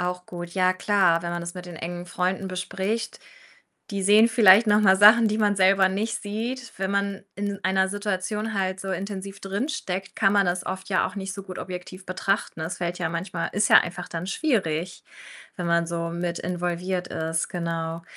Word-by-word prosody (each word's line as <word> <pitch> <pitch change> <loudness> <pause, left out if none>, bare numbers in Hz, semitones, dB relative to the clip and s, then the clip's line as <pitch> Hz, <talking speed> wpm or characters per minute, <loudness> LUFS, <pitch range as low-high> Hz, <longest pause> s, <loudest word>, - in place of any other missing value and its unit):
Auch 180 0 -3
gut. 175 -1 -7
Ja, 185 0 +2
klar, 185 -3 +2
wenn 170 - -3
man 175 0 -3
das 170 +1 -6
mit 180 -1 -8
den 175 - -9
engen 175 +2 -6
Freunden 185 +2 -1
bespricht, 190 +5 -3 0.7
die 200 -1 -3
sehen 210 +4 +6
vielleicht 220 -1 +7
noch 210 0 +4
mal 190 -2 +5
Sachen, 215 +3 +7
die 215 - -1
man 205 -2 +2
selber 190 0 +5
nicht 215 +4 -2
sieht. 235 +6 -4
Wenn 190 0 -1
man 200 -1 -1
in 200 0 -3
einer 190 0 +2
Situation 205 +2 -2
halt 190 -1 -1
so 195 0 -4
intensiv 195 +1 -5
drin 200 +9 -3
steckt, 195 -10 -4
kann 195 -3 +3
man 200 - +4
das 180 +1 -1
oft 190 0 -5
ja 185 - +2
auch - - -8
nicht 190 -1 -4
so 195 - -7
gut 185 -1 -8
objektiv 185 +1 -7
betrachten. 190 -1 -2
Das 165 +3 -4
fällt 175 0 -3
ja 175 -2 -1
manchmal 170 0 -3
ist 205 +2 +2
ja - - +10
einfach 175 +1 -3
dann 165 +1 -5
schwierig, 185 - -1 0.5
wenn 175 - -3
man 170 0 +2
so 170 0 -3
mit 170 0 -3
involviert 180 +1 -3
ist, 160 0 -2
genau. 165 -1 -3
190 Hz, 200 wpm, -25 LUFS, 175-200 Hz, 0.7 s, ja